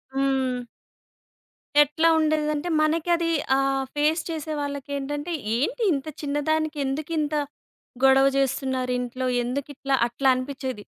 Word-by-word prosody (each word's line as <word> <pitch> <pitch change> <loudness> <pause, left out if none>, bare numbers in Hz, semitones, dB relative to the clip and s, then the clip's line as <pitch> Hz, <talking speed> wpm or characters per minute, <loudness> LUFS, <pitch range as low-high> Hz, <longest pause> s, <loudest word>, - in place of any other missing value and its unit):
హ్మ్. 265 -2 +1 1.2
ఎట్లా 295 +3 +4
ఉండేదంటే, 305 +1 0
మనకి 315 +2 +1
అదీ 335 0 -1 0.3
ఆహ్, 270 0 +1
ఫేస్ 305 +3 +2
చేసే 315 -1 -4
వాళ్ళకేంటంటే, 285 +2 -4 0.2
ఏంటి 460 - -1
ఇంత 275 0 -2 0.2
చిన్న 285 0 -2
దానికి 315 -1 0
ఎందుకింత 305 +2 -2 0.7
గొడవ 270 0 +6
జేస్తున్నారింట్లో, 255 -2 -1 0.2
ఎందుకిట్లా? 275 +2 -3
అట్లా 265 +3 0
అనిపిచ్చేది. 255 -3 -4
280 Hz, 105 wpm, -25 LUFS, 265-310 Hz, 1.2 s, గొడవ